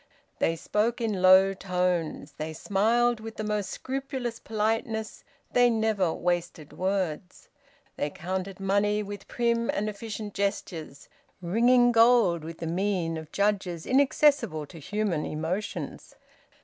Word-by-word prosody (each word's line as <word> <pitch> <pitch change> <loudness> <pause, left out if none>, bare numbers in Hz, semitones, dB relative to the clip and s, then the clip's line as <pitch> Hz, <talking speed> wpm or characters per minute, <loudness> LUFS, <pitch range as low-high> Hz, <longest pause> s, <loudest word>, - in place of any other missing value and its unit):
They 165 - +2
spoke 215 +8 0
in 215 -5 -1
low 190 +1 +7
tones; 180 -5 -1
they 155 +1 -4
smiled 230 +7 +2
with 220 0 -8
the 215 - -4
most 210 -2 -1
scrupulous 260 -3 -4
politeness; 220 0 -2 0.3
they 245 0 +5
never 220 -6 +1
wasted 175 -3 -2
words. 185 -2 -3 0.5
They 145 - -1
counted 185 +4 -5
money 200 +2 +1
with 205 -1 -8
prim 235 -1 0
and 210 - 0
efficient 210 0 -6
gestures, 170 -7 -3 0.3
ringing 240 +7 +4
gold 225 -8 +4
with 165 +1 -7
the 165 - -5
mien 175 -1 -1
of 160 -1 -8
judges 195 -5 0
inaccessible 265 - +3
to 165 +3 -12
human 200 -1 -1
emotions. 165 +7 -4
200 Hz, 125 wpm, -27 LUFS, 175-225 Hz, 0.5 s, low